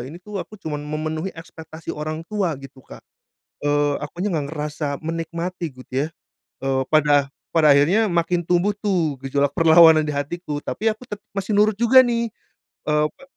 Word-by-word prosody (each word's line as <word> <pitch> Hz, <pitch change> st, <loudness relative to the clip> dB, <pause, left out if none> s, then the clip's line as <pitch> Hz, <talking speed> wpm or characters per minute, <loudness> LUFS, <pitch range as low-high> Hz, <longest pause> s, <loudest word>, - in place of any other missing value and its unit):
Ini 155 Hz, -, -9 dB
tuh 210 Hz, -2 st, -5 dB
aku 215 Hz, -, -9 dB
cuma 155 Hz, -6 st, -5 dB
memenuhi 155 Hz, +3 st, -3 dB
ekspektasi 160 Hz, -1 st, -9 dB
orang 155 Hz, +2 st, -5 dB
tua 190 Hz, -6 st, -1 dB
gitu, 135 Hz, 0 st, -13 dB
Kak, -, -, -14 dB, 0.6 s
eee, 145 Hz, 0 st, +2 dB
akunya 175 Hz, +7 st, -4 dB
enggak 150 Hz, -4 st, -2 dB
ngerasa 150 Hz, -1 st, -3 dB
menikmati 165 Hz, +1 st, -4 dB
gitt 130 Hz, 0 st, -14 dB
ya, 135 Hz, +3 st, 0 dB, 0.6 s
eee, 135 Hz, -1 st, +1 dB
pada 145 Hz, -2 st, +3 dB, 0.3 s
pada 155 Hz, -3 st, +6 dB
akhirnya 165 Hz, +11 st, +4 dB
makin 175 Hz, -2 st, 0 dB
tumbuh 180 Hz, +4 st, +1 dB
tuh 180 Hz, -8 st, 0 dB
gejolak 140 Hz, +1 st, +1 dB
perlawanan 160 Hz, -1 st, +7 dB
di 150 Hz, -, -2 dB
hatiku, 145 Hz, +1 st, -4 dB
tapi 215 Hz, +12 st, -1 dB
aku 245 Hz, +3 st, -14 dB
tetap 210 Hz, 0 st, -7 dB
masih 200 Hz, +1 st, -2 dB
nurut 210 Hz, +1 st, +4 dB
juga 235 Hz, +5 st, +6 dB
nih, 235 Hz, -1 st, 0 dB, 0.6 s
eee, 150 Hz, 0 st, +3 dB
apa -, -, -20 dB
160 Hz, 165 wpm, -22 LUFS, 150-190 Hz, 0.6 s, perlawanan